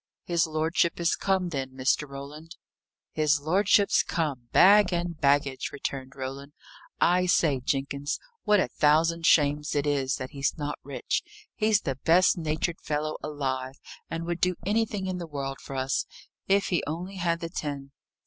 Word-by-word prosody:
"His 170 -2 +1
lordship 160 +2 0
is 170 -1 +2
come, 190 -2 0
then, 135 -4 -4
Mr. 135 +3 0
Roland?" 150 +5 -9 0.6
"His 155 -1 +2
lordship's 195 +6 +3
come, 145 -8 -3
bag 205 0 +6
and 175 -1 -2
baggage," 140 -2 +1
returned 135 -1 -5
Roland. 135 +2 -6 0.5
"I 180 +1 +3
say, 150 -6 +3
Jenkins, 140 +2 -2 0.3
what 210 -1 +4
a - - +2
thousand 165 +2 +2
shames 150 -1 +3
it 145 0 +1
is 140 -2 0
that 130 -1 -6
he's 140 +2 -1
not 145 -1 -4
rich! - - -2 0.3
He 215 - 0
is 215 -2 +4
the 135 -1 -4
best 175 +3 +5
natured 160 +1 -2
fellow 155 0 -2
alive, 135 -3 -3 0.3
and 165 +1 -4
would 175 0 -3
do 180 0 +2
anything 210 -1 0
in 185 -1 -3
the 170 - -6
world 135 -2 -5
for 135 - -8
us, 130 +1 -1 0.4
if 195 +1 +2
he 175 - +1
only 180 +6 -5
had 170 -2 0
the 165 - -5
tin." 140 -5 -5
155 Hz, 165 wpm, -27 LUFS, 140-175 Hz, 0.6 s, bag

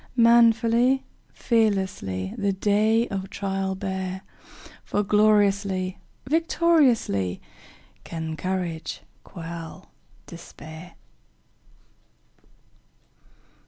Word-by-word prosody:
Manfully, 235 +2 +4 0.3
fearlessly, 190 - 0
The 200 -1 0
day 215 +4 +2
of 195 -1 -4
trial 195 -1 -2
bear, 190 -1 -4 0.6
For 205 - -1
gloriously, 200 -3 +2 0.3
victoriously, 290 - +2 0.6
Can 160 -1 -5
courage 170 -1 -4 0.2
quell 165 +1 -9 0.3
despair! 165 0 -11
195 Hz, 60 wpm, -25 LUFS, 175-225 Hz, 0.6 s, Manfully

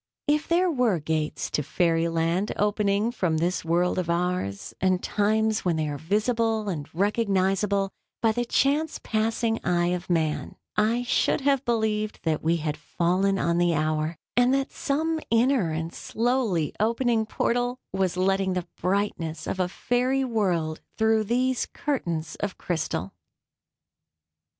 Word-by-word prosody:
If 300 +1 +2
there 350 +1 +3
were 250 - +2
gates 155 0 -2
to - - 0
fairy 165 +2 +1
land 165 +4 0
opening 210 +1 +1
from 180 -9 0
this 175 +3 0
world 175 +3 +1
of 175 -2 -3
ours, 170 - -1
and 185 -1 +2
times 220 +1 +1
when 175 -3 +1
they 155 -1 -1
are 145 -1 -4
visible 220 - 0
and 150 -6 -4
recognizable 195 0 +1 0.3
by 225 - +3
the 240 +2 -1
chance 285 +6 +1
passing 225 +1 0
eye 175 -1 +2
of 180 0 -3
man, 160 -3 0 0.2
I 225 +3 +2
should 245 - +1
have 275 -1 +2
believed 220 -2 0
that 160 -2 0
we 165 +2 +2
had 150 -1 -3
fallen 180 +6 +1
on 170 -2 +1
the 175 -1 +3
hour, 155 +1 0 0.2
and 245 +1 +4
that 275 0 -1
some 315 +3 -1
inner 230 -4 +3
and 160 +1 -3
slowly 225 - 0
opening 230 0 +1
portal 245 +3 0 0.2
was 190 -2 0
letting 190 0 +2
the 180 -1 -2 0.2
brightness 175 -4 -1
of 190 - -3
a 180 - +2
fairy 255 +6 0
world 180 -9 0 0.2
through 220 -1 +3
these 250 +3 +1
curtains 170 - -2
of 205 -2 -4
crystal. 100 - -3
195 Hz, 145 wpm, -26 LUFS, 170-230 Hz, 0.3 s, and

